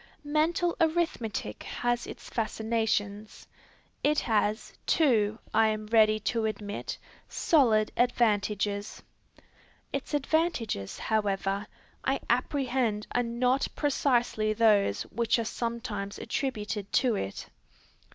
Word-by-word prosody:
Mental 325 +4 +1
arithmetic 315 - 0
has 240 -1 -2
its - - -9
fascinations. 220 -2 -2 0.6
It 300 +1 +3
has, 215 -1 0
too, 220 -9 +3 0.2
I 220 0 +5
am 215 0 -2
ready 215 -1 +4
to 230 +1 0
admit, 205 -1 -4 0.3
solid 225 -9 +3
advantages. 210 -4 0 0.9
Its 275 +2 -2
advantages, 280 - 0
however, 200 -2 -1 0.4
I - - +1
apprehend 250 -6 0
are 245 - +3
not 250 +3 +1
precisely 240 -7 +1
those 210 - +3
which 235 +1 0
are 230 - -1
sometimes 230 -3 -4
attributed 210 -6 -3
to 255 -3 +3
it. 95 - -4
225 Hz, 100 wpm, -29 LUFS, 210-250 Hz, 0.9 s, I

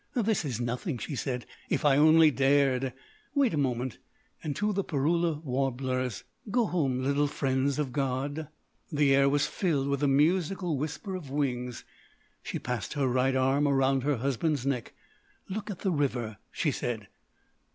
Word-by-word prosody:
"This 220 -6 +1
is 130 -7 -3
nothing," 125 +5 -2
she 140 - -5
said. 125 -2 -3 0.2
"If - - 0
I 140 -2 +6
only 155 +2 +6
dared—wait 145 - +1
a - - +1
moment!— 130 -4 -1 0.2
" - - -33
And, 145 -3 -3
to 210 0 0
the 195 0 0
Parula 160 +1 0
warblers: 130 -3 -1 0.3
"Go 235 +2 +2
home, 135 -9 0
little 140 +2 +2
friends 135 -1 0
of 140 -4 -2
God!" 140 +3 -2 0.4
The 145 -2 +3
air 140 0 +5
was 145 0 +2
filled 150 -8 0
with 140 -1 0
the 145 - +2
musical 170 +4 +2
whisper 155 +8 -4
of 175 -7 -6
wings. 125 -4 -2 0.6
She - - -4
passed 125 -4 -3
her 140 -3 +1
right 130 +1 +2
arm 135 +3 +3
around 135 -1 +3
her 140 0 +1
husband's 140 +2 0
neck. 130 -4 -2 0.6
"Look 210 +2 -4
at 195 - -6
the 190 - +1
river," 125 - -1
she 150 - 0
said. 115 -5 -3
140 Hz, 160 wpm, -29 LUFS, 130-160 Hz, 0.6 s, I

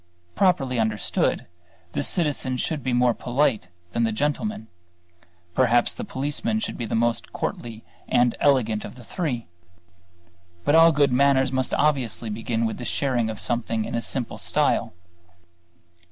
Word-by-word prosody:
Properly 135 -10 +2
understood, 110 -1 0 0.5
the - - -1
citizen 145 -5 -1
should 150 +4 -2
be 130 - -2
more 120 0 +3
polite 120 -6 0 0.2
than 115 +5 0
the 115 - +2
gentleman; 145 - -2 0.9
perhaps 120 0 +3
the 240 - -6
policeman 150 - -1
should 220 - -4
be 120 - -4
the - - -2
most 115 +1 0
courtly 115 -2 -5 0.3
and 120 -1 +3
elegant 115 -7 +2
of - - -8
the 125 - -13
three. 125 -4 -3 1.2
But - - +3
all 165 +1 +8
good 145 -3 +3
manners 135 0 +3
must 130 -1 0
obviously 130 -7 0
begin 115 +1 -1
with 110 - -2
the - - -5
sharing 120 -3 0
of 110 - -5
something 115 -2 -1
in - - -6
a 115 - 0
simple 125 0 -4
style. - - +1
125 Hz, 150 wpm, -24 LUFS, 115-145 Hz, 1.2 s, all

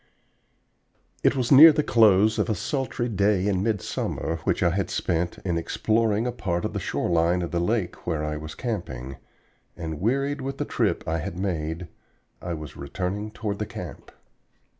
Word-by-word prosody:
IT - - +3
was 125 -3 -1
near 155 +4 +11
the 150 0 +1
close 110 -3 +4
of - - +1
a 110 - +1
sultry 130 - -2
day 100 -3 +2
in 95 -3 +1
midsummer, 100 -5 -2
which - - +1
I 85 - +4
had 95 +1 -1
spent 85 -2 -1
in 85 -3 0
exploring 110 +5 +1
a 125 - 0
part 85 -7 -2
of - - -3
the - - -2
shore - - -2
line 85 +1 +2
of 85 - -4
the 85 - 0
lake 100 +1 -1
where 80 -3 -1
I 75 0 -2
was 75 0 -7
camping, 70 - -5 0.6
and 80 -2 -5
wearied 140 +6 0
with 135 +1 -4
the 145 - -2
trip 105 -11 0
I 80 +1 0
had 80 +2 -5
made, 85 -2 -3 0.5
I 85 -1 -3
was 75 -4 -8
returning 95 +8 -4
toward 105 -2 -4
the 105 - -2
camp. - - -8
95 Hz, 180 wpm, -25 LUFS, 85-115 Hz, 0.6 s, near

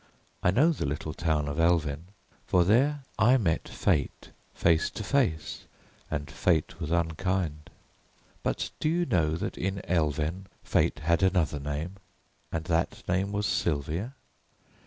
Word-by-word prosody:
I - - +3
know 140 - +4
the 150 - -2
little 75 +2 -3
town 75 -3 0
of 70 +2 -3
Elven, 80 -2 +2 0.4
for 90 -1 +4
there 135 +9 +3 0.2
I 120 +5 +6
met 85 -9 0
Fate - - -1 0.2
face 80 -1 +3
to 110 - -6
face 105 - 0 0.4
and 75 -2 -3
Fate 85 -2 +1
was 80 -3 -4
unkind. 85 -1 -1 0.7
But - - -2
do 155 - +1
you 175 +2 +1
know 80 - +1
that 95 +5 -4
in 95 +1 -2
Elven 80 +2 0 0.2
Fate 75 - +1
had 85 +3 +2
another 90 -7 +2
name, 75 +7 -4 0.5
and 80 - -2
that 85 0 0
name 95 +3 0
was 105 0 -1
Sylvia?" 85 - -1
85 Hz, 140 wpm, -28 LUFS, 75-100 Hz, 0.7 s, I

